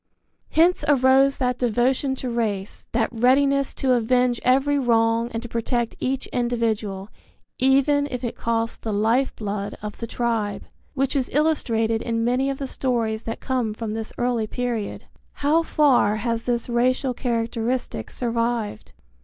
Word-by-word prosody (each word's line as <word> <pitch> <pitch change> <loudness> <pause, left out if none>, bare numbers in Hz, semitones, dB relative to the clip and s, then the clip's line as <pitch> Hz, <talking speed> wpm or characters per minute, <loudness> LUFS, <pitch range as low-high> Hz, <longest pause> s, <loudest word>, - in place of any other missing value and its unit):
Hence 345 +3 +3
arose 270 0 +4
that 250 -2 -1
devotion 250 +3 +1
to 255 -1 -4
race, 210 -4 -3
that 225 -1 0
readiness 275 +3 +3
to 265 - 0
avenge 245 +1 +2
every 275 +3 +3
wrong 230 -2 +2
and 230 +1 -4
to - - -6
protect 235 0 -2
each 265 +1 -1
individual, 225 -5 -1 0.5
even 275 +2 +3
if 250 -1 -5
it 240 - -3
cost 230 0 -2
the 220 - -3
life 225 +6 +1
blood 205 -1 -4
of 210 -1 -6
the 230 - -4
tribe, 225 -4 -2 0.3
which 270 +1 0
is 265 -3 0
illustrated 230 -7 +1
in 230 -1 -1
many 255 +3 +1
of 275 - -2
the 275 - -4
stories 230 -5 -1
that 225 - -5
come 245 -5 -1
from 220 -1 -4
this 220 0 -4
early 240 -3 0
period. 240 -3 -3 0.3
How 300 +3 +2
far 280 -10 +3
has 230 +1 -2
this 240 -1 -1
racial 255 +2 +1
characteristic 230 - -2
survived? 230 - -2
240 Hz, 150 wpm, -23 LUFS, 225-260 Hz, 0.5 s, arose